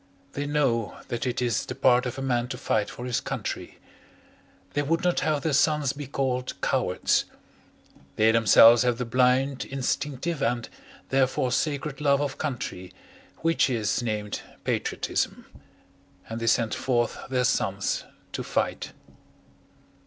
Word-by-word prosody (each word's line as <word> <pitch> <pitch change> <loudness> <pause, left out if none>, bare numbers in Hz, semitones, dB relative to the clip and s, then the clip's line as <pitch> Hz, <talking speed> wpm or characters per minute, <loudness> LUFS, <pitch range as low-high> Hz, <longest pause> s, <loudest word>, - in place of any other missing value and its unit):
They 145 +1 -3
know 135 -7 0
that 120 0 -2
it 125 0 -1
is 120 -5 0
the - - -5
part 125 -1 +4
of 125 - -5
a 135 - -4
man 120 -2 0
to 135 - -5
fight 105 -2 0
for 120 - -7
his 125 -2 -1
country. - - -5 1.0
They 145 - +1
would 165 +4 0
not 180 -1 +2
have 155 -2 0
their 160 -3 0
sons 145 -1 +2
be 145 -1 -7
called 130 -2 -2
cowards. - - +1 0.9
They 110 +1 +4
themselves 115 +1 +7
have 125 -2 +1
the 125 - -2
blind, 130 +3 +2
instinctive, 140 +3 -2
and 120 -1 0 0.4
therefore 130 -1 +1
sacred 145 +1 -1
love 140 -1 +3
of 145 -2 -3
country, 120 -10 -4 0.5
which 165 -3 +3
is 115 -2 0
named 105 -3 -3 0.2
patriotism - - -2 0.8
and 115 +1 -5
they 115 - -2
send 115 -1 +2
forth 120 -3 0
their 130 -1 +1
sons 110 -6 0 0.3
to - - -4
fight. - - -2
125 Hz, 145 wpm, -26 LUFS, 115-140 Hz, 1.0 s, themselves